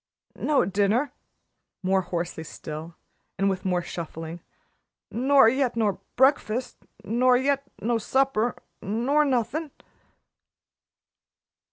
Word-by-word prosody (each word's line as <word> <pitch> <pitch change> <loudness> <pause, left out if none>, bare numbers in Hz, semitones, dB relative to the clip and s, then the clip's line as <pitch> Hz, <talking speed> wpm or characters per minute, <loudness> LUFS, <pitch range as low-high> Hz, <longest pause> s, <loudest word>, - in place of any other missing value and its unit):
"No 295 -10 +2
dinner," 205 +8 +1 0.7
more 190 +1 +3
hoarsely 175 -2 -4
still 160 +1 -8 0.4
and 195 0 +2
with 185 -1 -4
more 180 -2 0
shuffling, 165 0 -6 0.7
"nor 260 +3 +5
yet 255 +1 +1
no 210 -4 0
bre'fast 260 -3 +2 0.3
nor 245 +4 +3
yet 275 +2 +1 0.2
no 230 +1 +1
supper 255 -1 +1 0.3
nor 245 +9 +2
nothin'." 285 +4 0
225 Hz, 95 wpm, -26 LUFS, 185-265 Hz, 0.7 s, nor